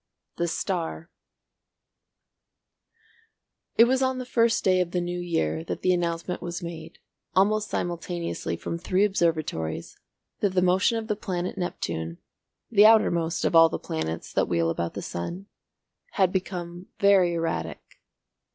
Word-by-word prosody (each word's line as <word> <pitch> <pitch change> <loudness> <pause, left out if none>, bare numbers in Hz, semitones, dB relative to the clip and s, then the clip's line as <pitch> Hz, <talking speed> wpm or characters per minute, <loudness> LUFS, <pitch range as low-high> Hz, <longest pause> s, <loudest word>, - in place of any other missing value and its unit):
THE 170 - 0
STAR 170 -1 -3 2.6
It 230 - +8
was 260 +2 +2
on 260 0 +1
the 255 - -4
first 230 -2 +2
day 185 -1 +4
of 180 - -1
the 180 - -1
New 175 0 -3
Year 80 - -1
that - - -5
the 185 - +4
announcement 170 0 -2
was 175 0 -5
made, 165 -2 -8 0.4
almost 210 +3 +3
simultaneously 175 0 -3
from 170 - -4
three 185 +3 +2
observatories, 155 - -1 0.4
that 195 -3 0
the 180 - +4
motion 185 +5 +3
of 220 -1 -4
the 210 - 0
planet 185 -3 -3
Neptune, 85 - -4 0.5
the 210 -1 +7
outermost 170 -7 +3
of - - +1
all 165 0 +8
the - - -3
planets 80 +1 -4
that - - +2
wheel 85 -1 +1
about 85 0 -3
the - - -5
sun, 170 - -5 0.7
had 190 -3 +3
become 180 -1 -4
very 195 -4 +4
erratic. 165 - -2
175 Hz, 140 wpm, -26 LUFS, 165-195 Hz, 2.6 s, It